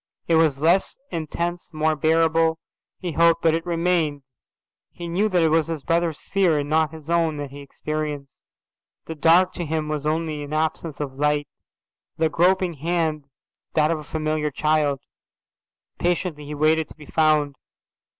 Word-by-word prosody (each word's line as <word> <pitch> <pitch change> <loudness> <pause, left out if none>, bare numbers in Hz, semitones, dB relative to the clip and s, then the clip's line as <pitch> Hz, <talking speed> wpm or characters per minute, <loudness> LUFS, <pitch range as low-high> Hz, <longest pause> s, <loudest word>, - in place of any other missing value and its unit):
It 170 - +2
was 160 -4 +4
less 170 +6 +2
intense, 170 +2 -3
more 155 0 +1
bearable, 160 +1 +2 0.4
he 180 -2 -3
hoped, 170 +1 +3
but 165 -1 +4
it 165 0 -1
remained. 165 -4 0 0.7
He 175 - -8
knew 195 +6 +1
that 180 -4 +2
it 160 - +4
was 160 0 +2
his 160 -4 -4
brother's 165 -2 0
fear 185 -5 +2
and 145 -1 -2
not 155 +1 +2
his 160 -2 -11
own 165 -2 +1
that 145 -2 -5
he 140 - -9
experienced. 145 -1 -5 0.6
The 160 - -5
dark 170 +4 +4
to 175 - -4
him 155 -1 -2
was 150 -1 -2
only 155 -1 -1
an 145 +1 -6
absence 155 0 -2
of 145 -3 -4
light; 145 +1 0 0.7
the 160 0 +2
groping 180 +2 +2
hand 160 -1 -1 0.5
that 155 0 +3
of 165 - -1
a - - -7
familiar 155 0 -1
child. 150 -1 +1 1.0
Patiently 175 -4 -1
he 150 - -5
waited 155 +1 +2
to - - -12
be 150 - -12
found. 155 -2 +2
160 Hz, 165 wpm, -23 LUFS, 150-170 Hz, 1.0 s, was